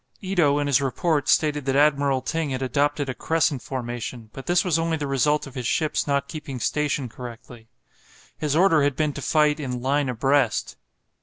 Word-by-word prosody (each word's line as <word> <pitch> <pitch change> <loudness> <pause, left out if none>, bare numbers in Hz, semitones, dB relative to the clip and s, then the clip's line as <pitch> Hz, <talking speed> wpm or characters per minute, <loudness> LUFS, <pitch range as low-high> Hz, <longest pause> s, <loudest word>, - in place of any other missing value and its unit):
Ito 175 -7 +2
in 145 - 0
his 140 -1 +3
report 145 +2 0
stated 150 -3 +2
that 135 -1 0
Admiral 140 -2 +3
Ting 160 +1 -2
had 130 0 -3
adopted 145 +2 0
a 130 - -2
crescent 155 -3 0
formation, 120 -3 -6
but 135 - -9
this 175 +1 +2
was 165 -3 +2
only 165 0 0
the 150 - -3
result 140 +2 +1
of 135 - -11
his 125 -3 -4
ships 155 +2 0
not 140 -1 0
keeping 145 -5 -7
station 145 +3 -1
correctly. 120 -1 -10 0.7
His 150 -1 -2
order 165 -2 +4
had 140 -1 +1
been 150 -2 0
to 140 - -7
fight 150 +1 +2
in 125 -4 -4
"line 135 +2 0
abreast." 130 -1 +1
140 Hz, 185 wpm, -24 LUFS, 130-150 Hz, 0.7 s, order